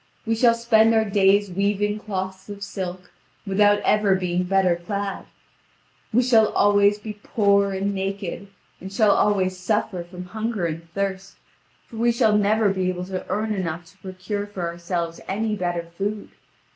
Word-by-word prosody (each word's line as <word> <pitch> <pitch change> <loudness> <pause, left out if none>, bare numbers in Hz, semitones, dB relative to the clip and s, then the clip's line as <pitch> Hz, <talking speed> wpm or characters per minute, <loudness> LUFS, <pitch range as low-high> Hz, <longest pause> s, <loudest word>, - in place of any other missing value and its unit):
We 225 - +1
shall 230 +1 +4
spend 225 -1 +4
our 220 0 +3
days 200 0 +3
weaving 205 +2 0
cloths 190 -2 -5
of 200 0 -7
silk, 185 -2 -6 0.3
without 205 +1 +3
ever 210 -2 +3
being 180 -1 -1
better 190 -1 +2
clad. 200 +3 -4 0.9
We 245 +3 +3
shall 225 -3 +5
always 205 0 +4
be 210 0 -8
poor 200 -3 +2
and 195 +1 -1
naked, 195 -1 -4 0.3
and 190 +1 -8
shall 210 +1 +3
always 190 -3 +2
suffer 190 -1 -1
from 180 +1 -9
hunger 220 0 -3
and 165 0 -5
thirst, 195 -1 -3 0.5
for 225 - -12
we 235 +1 +3
shall 220 -2 +3
never 210 +1 +3
be 185 -1 0
able 180 0 -3
to 185 0 -5
earn 215 +3 -1
enough 175 -3 -3
to - - -27
procure 190 +2 -5
for 195 -3 -6
ourselves 170 0 -3
any 215 +2 -1
better 175 -3 -2
food. 205 +3 -3
200 Hz, 160 wpm, -23 LUFS, 185-210 Hz, 0.9 s, shall